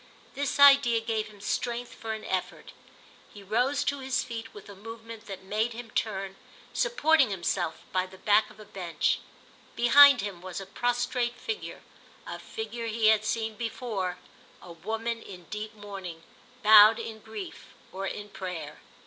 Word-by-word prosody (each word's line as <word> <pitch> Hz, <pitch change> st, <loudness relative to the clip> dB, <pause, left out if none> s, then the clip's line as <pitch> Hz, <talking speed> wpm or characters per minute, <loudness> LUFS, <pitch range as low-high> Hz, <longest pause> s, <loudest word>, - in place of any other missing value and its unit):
This 285 Hz, +1 st, -2 dB
idea 275 Hz, -5 st, +7 dB
gave 225 Hz, -1 st, -2 dB
him 210 Hz, -1 st, -15 dB
strength 235 Hz, +4 st, -2 dB
for 225 Hz, -1 st, -5 dB
an 220 Hz, -, -7 dB
effort; 185 Hz, -1 st, -3 dB, 0.6 s
he 205 Hz, -, -12 dB
rose 245 Hz, +8 st, +1 dB
to 280 Hz, 0 st, -1 dB
his 265 Hz, 0 st, -1 dB
feet 230 Hz, -2 st, -7 dB
with 205 Hz, -, -12 dB
a 200 Hz, -, -10 dB
movement 225 Hz, +2 st, -10 dB
that 195 Hz, -2 st, -7 dB
made 215 Hz, +4 st, -1 dB
him 230 Hz, -1 st, -9 dB
turn, 195 Hz, -3 st, -2 dB, 0.4 s
supporting 320 Hz, -, +3 dB
himself 175 Hz, -3 st, -2 dB
by 185 Hz, 0 st, 0 dB
the 190 Hz, +1 st, -14 dB
back 210 Hz, +3 st, +3 dB
of 215 Hz, -, -17 dB
a 215 Hz, -, -11 dB
bench. 185 Hz, -4 st, -1 dB, 0.6 s
Behind 275 Hz, +2 st, +8 dB
him 195 Hz, -4 st, -5 dB
was 185 Hz, 0 st, -6 dB
a 195 Hz, -, -7 dB
prostrate 245 Hz, +3 st, -1 dB
figure, 440 Hz, -2 st, -5 dB, 0.4 s
a -, -, -6 dB
figure 240 Hz, -, -6 dB
he 220 Hz, -1 st, +3 dB
had 215 Hz, -1 st, +4 dB
seen 220 Hz, 0 st, -1 dB
before; 215 Hz, -5 st, -3 dB, 0.4 s
a 175 Hz, -, -12 dB
woman 225 Hz, +7 st, -4 dB
in 180 Hz, -2 st, -11 dB
deep 215 Hz, +1 st, -5 dB
mourning, 195 Hz, -5 st, -8 dB, 0.4 s
bowed 215 Hz, +1 st, +9 dB
in 220 Hz, -1 st, -6 dB
grief 220 Hz, -2 st, -8 dB, 0.2 s
or 195 Hz, +1 st, -4 dB
in 205 Hz, +2 st, -6 dB
prayer. 180 Hz, -4 st, -6 dB
220 Hz, 160 wpm, -28 LUFS, 195-240 Hz, 0.6 s, bowed